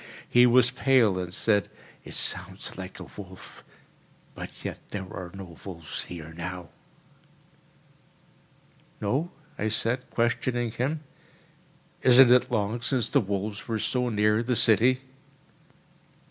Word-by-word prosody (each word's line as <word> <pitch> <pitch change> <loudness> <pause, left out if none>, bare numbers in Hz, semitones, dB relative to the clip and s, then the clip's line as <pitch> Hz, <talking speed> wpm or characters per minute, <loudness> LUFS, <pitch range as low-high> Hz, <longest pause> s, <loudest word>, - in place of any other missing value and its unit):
He 125 0 +6
was 125 0 +5
pale, 125 -7 +3
and 90 -1 -4
said, 105 +2 +1 0.3
"It - - -6
sounds - - 0
like 95 0 -8
a - - -7
wolf—but 95 -2 -13
yet - - -4
there 100 -2 -4
are 90 -1 -6
no 90 -4 -10
wolves 85 -5 -5
here 80 -2 -9
now." 90 0 -6 2.3
"No?" 135 +12 -1 0.3
I 110 - 0
said, 120 +4 0
questioning 120 0 0
him; 135 +7 -2 1.0
"isn't 125 0 +7
it 125 0 +5
long 110 0 -1
since 125 0 0
the - - +3
wolves 100 0 -4
were 115 -2 -1
so 125 +3 0
near 105 0 +2
the 120 +1 0
city?" 120 +4 +4
110 Hz, 120 wpm, -27 LUFS, 95-125 Hz, 2.3 s, isn't